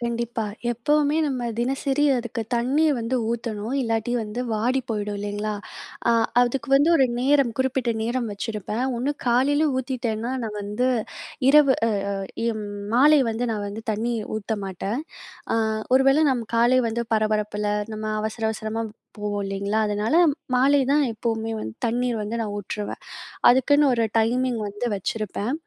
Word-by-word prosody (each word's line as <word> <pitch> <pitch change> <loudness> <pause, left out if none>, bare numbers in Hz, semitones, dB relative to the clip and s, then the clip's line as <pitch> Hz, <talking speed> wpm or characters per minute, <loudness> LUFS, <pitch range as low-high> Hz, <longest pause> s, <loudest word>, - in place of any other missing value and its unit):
கண்டிப்பா. 235 -1 -2 0.3
எப்பவுமே 295 +5 +1
நம்ம 255 -4 -2
தினசரி 270 +3 0
அதுக்கு 240 -1 -3
தண்ணீ 260 +7 +2
வந்து 230 +3 -1
ஊத்தணும், 230 0 -3
இல்லாட்டி 225 0 -1
வந்து 215 +3 -5
வாடி 240 +5 +1
போயிடும் 210 -1 -2
இல்லைங்களா? 205 +1 -3 0.5
அ - - +5 0.3
அதுக்கு 245 0 0
வந்து 285 +4 +4
ஒரு 265 -3 +4
நேரம், 275 -1 +3
குறிப்பிட்ட 260 -2 0
நேரம் 235 0 -1
வச்சிருப்பேன். 215 +3 -3
ஒன்னு 275 +4 0
காலையில 285 +6 +3
ஊத்திட்டேன்னா, 245 -2 -2
நான் 210 -1 -5
வந்து 210 +5 -1 0.6
இரவு 280 -2 +6
அ - - +1 0.5
அ - - +1
ம் - - -5 0.3
மாலை 290 +4 +6
வந்து 225 +2 -2
நான் 205 -2 -3
வந்து 210 +2 -7
தண்ணி 230 +3 -1 0.2
ஊத்த 215 +1 -4
மாட்டேன். 195 +6 -3 0.5
அ - - +2 0.4
ஒருவேள 270 +2 +5
நம் 245 -3 -1
காலை 245 +2 +4
வந்து 235 +1 -2
பரபரப்புல, 210 -1 0 0.3
நம்ம 215 0 -5 0.2
அவசர, 220 +1 -4
அவசரமாப் 220 0 -4 0.3
போவோம் 205 -1 -2
இல்லைங்களா? 200 +2 -1
அதனால, 210 +7 0 0.4
மாலை 275 +3 +4
தான் 295 +1 +4
எப்பவுமே 225 0 -2
வந்து 110 - -6
தண்ணீர் 240 0 0
வந்து 210 +2 -3
நான் 215 -2 -3
ஊற்றுவேன். 205 +1 -5 0.5
அதுக்குன்னு 285 +4 +4
ஒரு 230 -2 +2
டைமிங் 245 +2 +1
வந்து 205 +4 -4
வச்சிருப்பேன். 215 +4 -3
235 Hz, 145 wpm, -24 LUFS, 215-255 Hz, 0.6 s, இரவு